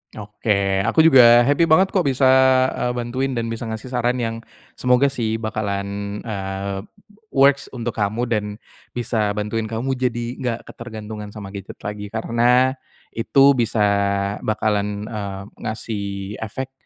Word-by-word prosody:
Oke, 100 -2 -1
aku 160 +8 +4
juga 120 -6 +8
happy 145 +6 +3
banget 185 +4 +4
kok 185 -7 +1
bisa, 135 0 0 0.5
eee, 125 0 -2
bantuin 130 +2 -2
dan 115 -1 -2
bisa 115 +1 -5
ngasih 110 +3 -6
saran 125 0 +1
yang 115 -2 -2 0.4
semoga 125 +2 +3
sih 115 -5 -1
bakalan, 100 -2 -3
eee, 100 -2 -4 0.5
works 140 -3 +3
untuk 120 -1 -3
kamu 105 +2 -1
dan 110 -4 0 0.5
bisa 110 -4 -1
bantuin 105 +1 -2
kamu 115 +4 -2
jadi 120 -2 -1
enggak 120 -3 -2
ketergantungan 110 -2 -8
sama 100 -2 -8
gadget 100 -1 -8
lagi. 105 0 -5
Karena 120 +4 +2 0.4
itu 135 +4 +4
bisa 115 -4 +1 0.6
bakalan, 105 -1 -1
eee, 100 -3 -5 0.2
ngasih 110 -1 -4 0.3
efek 130 +5 -5
115 Hz, 135 wpm, -21 LUFS, 105-125 Hz, 0.6 s, juga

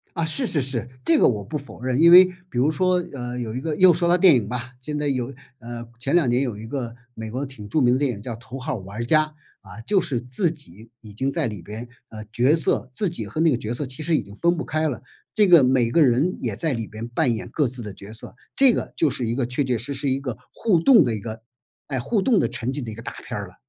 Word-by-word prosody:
啊， 165 - 0
是 165 - +3
是 150 -10 +1
是， 125 -3 -2 0.2
这 165 - +4
个 - - +5
我 105 -4 +1
不 125 +10 -4
否 140 -3 -11
认， 130 +1 0
因 170 +1 +7
为 185 +1 +10 0.2
比 125 - -11
如 130 +5 +3
说， 185 +2 +1
呃， 125 -2 -5
有 115 -2 -4
一 125 - -4
个 155 +2 -2
又 185 +2 +6
说 170 +1 +1
到 175 - +5
电 180 -5 +6
影 105 -5 -1
吧， 125 +2 -5
现 150 +4 -5
在 150 0 -1
有 130 -1 -2 0.2
呃， 120 0 -8
前 135 +5 -1
两 170 -7 +4
年 120 +1 +2
有 125 -6 -2
一 110 +2 -8
个 120 -3 -4 0.2
美 110 -1 -7
国 130 +3 -3
挺 125 -7 -10
著 150 - +1
名 125 -2 +4
的 - - +1
电 140 -2 0
影 105 -2 -9
叫 120 - -5
《头 120 +2 -10
号 130 0 -3
玩 100 +3 -6
家》。 155 +4 +4 0.4
啊， 95 +2 -11
就 195 - +1
是 135 -9 -1
自 130 +8 0
己 115 - -9
已 105 -3 -13
经 135 +6 -1
在 - - -1
里 105 -5 -6
边 110 +3 -8 0.2
呃， 110 -1 -8
角 125 +6 +3
色 160 -4 +1
自 190 +10 +2
己 170 - -3
和 155 - -4
那 165 0 +4
个 130 - +1
角 115 -1 -4
色 130 +4 -2
其 130 +4 -5
实 160 +2 +1
已 - - +2
经 100 +1 -14
分 170 +5 +1
不 - - -1
开 155 0 0
了， 120 -3 -7 0.3
这 210 -2 +4
个 170 -6 +7
每 125 -2 +2
个 165 - +4
人 140 +7 +2
也 - - -2
在 160 -5 -1
里 115 -2 -4
边 110 +3 -8
扮 120 0 +1
演 110 - -6
各 150 - 0
自 125 0 -4
的 105 -3 -7
角 100 +2 -11
色， 110 +2 -6 0.2
这 270 -3 +5
个 - - -4
就 160 - +2
是 125 -3 -2
一 115 - -1
个 130 -1 -1
确 125 +4 -1
确 125 -3 0
实 135 +6 -3
实 135 0 -1
一 135 +1 0
个 130 -5 -5 0.2
互 205 -7 +2
动 225 +3 +7
的 120 -6 0
一 - - -3
个， 110 +1 -7 0.5
诶， 135 -3 -2
互 205 - 0
动 225 +2 +3
的 - - +2
沉 125 +3 -3
浸 145 -2 -2
的 115 - -6
一 - - -7
个 115 - -9
大 - - -7
片 - - -4
儿 - - -7
了。 - - -18
130 Hz, 310 characters per minute, -23 LUFS, 115-155 Hz, 0.5 s, 为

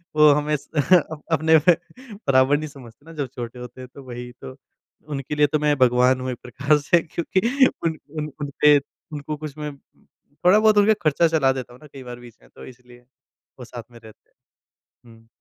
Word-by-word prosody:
वो 150 0 +7
हमें 150 +1 -1
अप 155 +2 +1
अपने 160 0 +4
बराबर 160 - +1
नहीं 155 0 -5
समझते 135 -1 -15
ना 165 - -12
जब 145 -4 -3
छोटे 120 0 -7
होते 125 +1 -10
हैं 125 - -9
तो 140 - -12
वही 125 -1 -8
तो। 130 - -9 0.5
उनके 140 0 -4
लिए 150 0 +4
तो 150 +1 -1
मैं 150 -1 +2
भगवान 125 0 +3
हूँ 130 0 -3
एक 120 - -6
प्रकार 140 +4 +1
से 170 +3 +2
क्योंकि 230 - +1 0.2
उन 160 -1 -1 0.2
उन 150 -1 -4
उनपे 145 +1 +4 0.4
उनको 150 +1 -5
कुछ 155 -1 -8
मैं 150 -1 -6
थोड़ा 175 +8 -1
बहुत 215 -1 +4
उनका 205 +1 +5
ख़र्चा 155 +2 +3
चला 155 -5 +2
देता 125 -2 -7
हूँ 125 - -16
ना 150 - -14
कई 135 - -10
बार 120 -1 -9
बीच 120 -1 -15
में - - -22
तो - - -11
इसलिए 125 -1 -16 0.5
वो 125 - -8
साथ 120 -1 -9
में 120 - -14
रहते। 110 -1 -18 0.8
हुँ। 115 0 -19
145 Hz, 195 wpm, -22 LUFS, 125-155 Hz, 0.8 s, वो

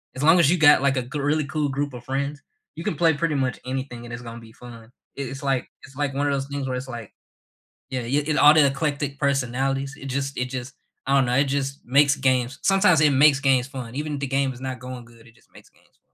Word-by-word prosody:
as 130 - -6
long 165 +3 +6
as 155 - +5
you 180 - +3
got, 150 -3 +6
like, 140 0 +2
a - - +1
g 135 +4 -6
really 145 +1 0
cool 150 0 -2
group 140 0 -3
of 120 -1 -9
friends, 140 +2 -3 0.3
you 165 - -7
can - - -2
play 165 +1 +3
pretty 155 -1 -1
much 130 -2 -1
anything 130 -2 -5
and 120 - -9
it's 120 - -6
gonna 115 0 -8
be 110 -1 -15
fun. 120 -1 -12
I 115 -1 -13 0.3
it's 135 0 -6
like 135 -2 0 0.2
it's 135 - -14
like 145 -1 -2
one 145 +1 0
of 140 - +1
those 135 0 -2
things 140 -1 -4
where 130 - -2
it's 130 +1 -6
like 115 -4 -8 0.8
yeah, 130 -1 -2
i - - -7
it 145 +4 0
all 150 +1 +8
the 150 -3 +6
eclectic 140 0 -2
personalities, 135 0 -1
it 135 - -8
just 135 0 -3
it 125 - 0
just 130 +1 -6 0.3
I 135 - +1
don't 135 -2 +4
know, 125 - 0
it 140 - +4
just 140 0 -2
makes 145 +3 +4
games 130 -1 0
sometimes 190 -5 +4
it 150 - +5
makes 140 +1 +5
games 130 -2 +2
fun, 125 -3 -8
even 150 0 -3
the 140 - -3
game 135 0 0
is 125 - -13
not 130 -1 -5
going 125 -1 -8
good, 115 0 -19
it 115 - -21
just - - -28
makes - - -17
games - - -29
fun. - - -38
135 Hz, 265 wpm, -23 LUFS, 130-145 Hz, 0.8 s, all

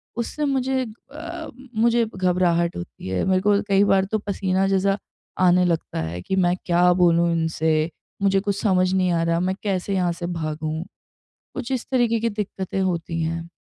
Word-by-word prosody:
उससे 240 +6 -2
मुझे 265 -1 0 0.3
अ, 330 +2 -7 0.3
मुझे 235 +1 +3
घबराहट 180 -2 +1
होती 85 - -8
है। 95 -1 -1
मेरे 185 -1 +2
को 205 0 +3
कई 195 0 +4
बार 195 -1 +3
तो 215 +2 -1
पसीना 195 -1 0
जैसा 195 +1 +2 0.5
आने 180 +1 +5
लगता 165 - -1
है 85 +2 -4
कि 190 - -2
मैं 180 -1 +3
क्या 180 0 +4
बोलूँ 170 -1 +3
इनसे? 160 -1 +1 0.3
मुझे 195 -1 +3
कुछ 200 0 -2
समझ 185 -3 +2
नहीं 185 -1 +2
आ 165 -1 +1
रहा। 165 0 +1
मैं 185 +2 0
कैसे 195 -1 -1
यहाँ 180 -2 +1
से 170 0 -5
भागूँ? 155 -1 -3 0.7
कुछ 240 - -5
इस 255 -2 -1
तरीके 235 -3 +2
की 230 +1 0
दिक्कतें 195 -2 -3
होती 170 -2 -1
हैं। 165 +1 -3
185 Hz, 175 wpm, -23 LUFS, 170-205 Hz, 0.7 s, आने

